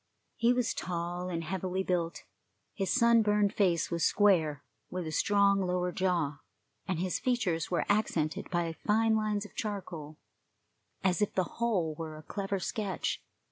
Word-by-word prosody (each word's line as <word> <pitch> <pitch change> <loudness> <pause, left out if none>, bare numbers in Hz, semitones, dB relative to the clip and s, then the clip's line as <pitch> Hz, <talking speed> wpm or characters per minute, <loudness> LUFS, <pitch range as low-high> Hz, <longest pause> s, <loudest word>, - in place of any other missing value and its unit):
He 235 +1 +3
was 245 -2 +1
tall 175 0 -3
and 165 -2 -2
heavily 185 +2 -2
built; 175 -2 -1 0.5
his 195 -2 -2
sunburned 215 -4 +4
face 175 -6 +2
was 170 -1 0
square, 160 -9 +3 0.3
with 180 -1 -4
a 155 - -4
strong 200 +3 +3
lower 180 -1 0
jaw, 170 -7 0 0.5
and 185 - -1
his 180 +1 -1
features 205 -11 0
were 175 - 0
accented 175 -7 0
by 170 -2 0
fine 220 +5 +2
lines 215 -1 0
of - - -13
charcoal, 175 -8 -5 0.9
as 185 -1 +2
if 210 - 0
the 185 - +3 0.2
whole 185 -9 +1
were 155 0 -6
a 155 - -11
clever 195 +3 -3
sketch. 195 0 -2
185 Hz, 150 wpm, -31 LUFS, 170-205 Hz, 0.9 s, sunburned